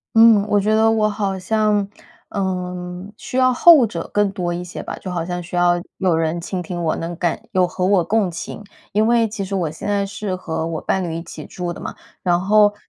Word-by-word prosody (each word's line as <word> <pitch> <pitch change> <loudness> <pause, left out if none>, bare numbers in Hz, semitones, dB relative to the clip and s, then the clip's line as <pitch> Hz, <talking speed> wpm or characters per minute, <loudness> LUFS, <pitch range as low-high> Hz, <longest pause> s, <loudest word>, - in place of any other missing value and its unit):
嗯， 225 -3 +7
我 205 -1 +3
觉 215 +2 +2
得 220 0 +4
我 215 -1 +2
好 200 -2 -2
像， 210 0 +1 0.4
嗯， 180 0 -4
需 250 - -7
要 255 0 +4
后 295 -1 +7
者 170 -6 -6
更 205 -1 +3
多 175 -2 -2
一 175 +1 -4
些 180 - -7
吧。 - - -6
就 185 - -7
好 170 -2 -2
像 175 0 -3
需 175 +1 -10
要 175 0 +3 0.2
有 180 -4 +2
人 165 +1 0
倾 180 +1 -4
听 175 0 -5
我 160 - 0
能 170 +1 -4
感 175 -2 -1
有 185 -1 +3
和 180 +1 -1
我 195 -2 +4
共 215 -1 +1
情。 170 +5 -7 0.3
因 215 +2 +2
为 230 -1 +3
其 205 -2 -4
实 195 +1 -5
我 170 -5 0
现 160 - -8
在 200 -1 +1
是 195 -1 -4
和 160 -3 -3
我 165 -1 -3
伴 190 -1 -1
侣 165 - -3
一 165 - -4
起 - - -9
住 175 -1 -4
的 - - -10
嘛， - - -6 0.3
然 175 -1 +2
后， 205 +1 +4
190 Hz, 245 characters per minute, -20 LUFS, 175-210 Hz, 0.4 s, 嗯